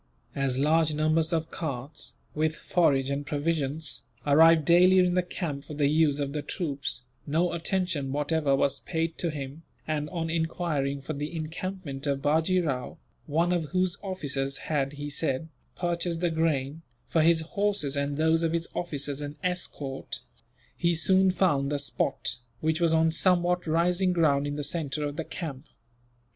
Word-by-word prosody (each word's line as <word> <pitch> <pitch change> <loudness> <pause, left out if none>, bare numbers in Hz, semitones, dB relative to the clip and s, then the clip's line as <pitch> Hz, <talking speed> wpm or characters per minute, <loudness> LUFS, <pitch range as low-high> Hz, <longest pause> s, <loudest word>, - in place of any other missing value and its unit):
As 135 -2 0
large 155 +2 +3
numbers 155 +2 +2
of 160 -1 -1
carts, 145 -2 -5 0.2
with 155 +1 0
forage 140 -8 +2
and 140 +1 -1
provisions, 150 +1 -1 0.2
arrived 160 +2 +6
daily 180 +3 +6
in 180 -1 +4
the 180 - +3
camp 160 -6 -4
for 150 - -8
the 145 -1 +1
use 155 -2 +3
of 140 -1 -2
the 150 - -2
troops, 140 -6 -3 0.2
no 165 +4 +1
attention 170 -5 -1
whatever 145 0 +1
was 135 0 +1
paid 165 -1 -3
to 170 - 0
him 145 0 -6 0.3
and, 150 -1 -1
on 165 -2 -3
enquiring 160 -4 -1
for 155 - -4
the 150 +3 -4
encampment 160 -2 -5
of 140 -1 +1
Bajee 160 +5 +3
Rao 130 -5 -3 0.3
one 165 +4 +2
of 170 -3 0
whose 185 +2 0
officers 140 -8 -2
had, 140 -2 0
he 145 0 -6
said, 145 +1 -1 0.3
purchased 170 -1 -1
the 175 -2 +1
grain, 160 -2 0 0.3
for 160 - +2
his 165 +1 +4
horses 195 -4 0
and 140 0 -1
those 160 +1 +3
of 165 -1 0
his 170 0 -1
officers 145 -4 -3
and 145 0 -5
escort 150 -7 -3 0.5
he 170 0 +1
soon 190 +3 +4
found 150 -7 +2
the 145 - +1
spot, 140 -2 -1 0.2
which 160 +3 0
was 165 -1 +4
on 160 0 +4
somewhat 180 0 +2
rising 175 +3 +2
ground 145 -4 +2
in 145 - -3
the 145 - -3
centre 150 -1 -1
of 145 0 -4
the 165 - -3
camp. 150 -4 -6
155 Hz, 165 wpm, -28 LUFS, 145-170 Hz, 0.5 s, arrived